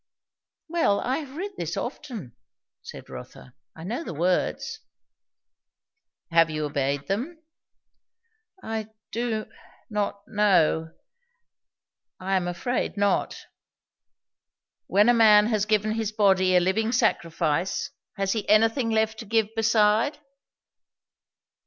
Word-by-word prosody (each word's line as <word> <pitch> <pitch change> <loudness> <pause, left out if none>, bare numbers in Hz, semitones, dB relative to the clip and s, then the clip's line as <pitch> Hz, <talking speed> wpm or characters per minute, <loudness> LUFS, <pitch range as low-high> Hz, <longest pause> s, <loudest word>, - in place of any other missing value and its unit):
"Well. 320 -12 +1
I 255 +2 -1
have 280 -3 -9
read 400 +4 -4
this - - -4
often," 215 - -6 0.5
said - - -10
Rotha. 65 0 -11 0.2
"I 160 - -10
know 230 - -4
the 170 - -7
words." 180 +4 -1 1.5
"Have 165 -1 +5
you 155 -1 -2
obeyed 140 -1 -1
them?" 250 - -3 1.3
"I 220 -1 -4 0.2
do 225 -2 -2 0.5
not 205 -1 -2
know. 170 -6 +2 1.3
I 190 +1 -1
am 180 -2 0
afraid, 190 +7 -2
not." 205 0 0 1.4
"When 205 +3 +4
a 240 - +6
man 215 -3 +6
has 215 -2 0
given 215 0 +1
his 220 -1 -2
body 190 -4 +3
a - - +7
living 215 +5 0
sacrifice, 180 - 0 0.3
has 195 -1 0
he 220 -1 -3
anything 225 +3 +3
left 220 0 0
to 230 - -7
give 220 0 0
beside?" 225 +4 +3
210 Hz, 115 wpm, -25 LUFS, 185-225 Hz, 1.5 s, a